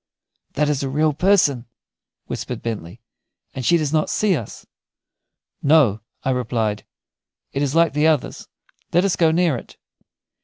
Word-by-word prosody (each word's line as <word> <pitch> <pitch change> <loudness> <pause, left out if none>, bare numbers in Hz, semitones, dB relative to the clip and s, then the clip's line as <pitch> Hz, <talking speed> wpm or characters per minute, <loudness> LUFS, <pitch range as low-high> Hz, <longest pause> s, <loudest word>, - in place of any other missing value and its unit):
"That 150 +1 +1
is 145 -2 0
a 135 - -2
real 150 +3 +1
person," 145 - +2 0.6
whispered - - -6
Bentley, 110 -2 -6 0.5
"and 130 - -5
she 170 +8 +4
does 155 -2 -2
not 155 -1 +1
see 205 -4 +2
us." 115 -8 -7 1.0
"No," 140 -8 +4 0.2
I 135 - 0
replied; 115 -4 -2 0.7
"it 140 - -1
is 145 +1 -1
like 165 -2 +3
the 150 +2 +2
others. 155 -4 -1 0.5
Let 175 +3 +4
us 195 - +1
go 165 -2 +3
near 165 -2 +2
it." - - -12
145 Hz, 150 wpm, -21 LUFS, 125-160 Hz, 1.0 s, she